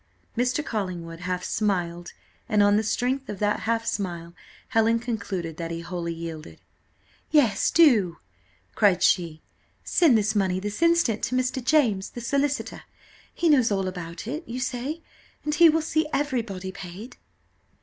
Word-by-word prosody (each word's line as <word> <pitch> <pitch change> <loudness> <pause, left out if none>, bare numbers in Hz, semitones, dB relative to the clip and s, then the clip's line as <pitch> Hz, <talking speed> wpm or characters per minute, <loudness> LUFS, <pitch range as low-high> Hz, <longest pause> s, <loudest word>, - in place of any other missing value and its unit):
Mr. 250 +5 0
Collingwood 175 -6 -4
half 180 0 -3
smiled, 175 -4 -2 0.4
and 210 -2 +4
on 205 0 +4
the 215 - +3
strength 250 +5 -1
of 205 - -4
that 205 +1 0
half 230 0 +1
smile 170 -5 -3 0.4
Helen 225 -2 +3
concluded 200 -9 -4
that 165 -1 -4
he 170 0 -4
wholly 170 0 -4
yielded. 165 -1 -7 0.7
"Yes, 240 -10 +3
do," 225 - +4 0.6
cried 195 -5 +3
she, 165 -4 +1 0.4
"send 305 -10 +4
this 215 0 +1
money 190 -3 +1
this 205 - -5
instant 335 -10 +3
to 255 - -3
Mr. 255 0 -1
James, 235 -9 +2
the 240 - -8
solicitor: 280 +4 -1 0.5
he 345 - -1
knows 265 -7 +5
all 195 -2 0
about 175 -1 -6
it, 295 +9 -4
you 245 +2 -5
say, 265 +5 -3 0.4
and 300 - 0
he 335 +2 +7
will 320 0 +2
see 315 0 0
everybody 230 -10 -2
paid." 195 +8 -9
215 Hz, 150 wpm, -25 LUFS, 180-255 Hz, 0.7 s, he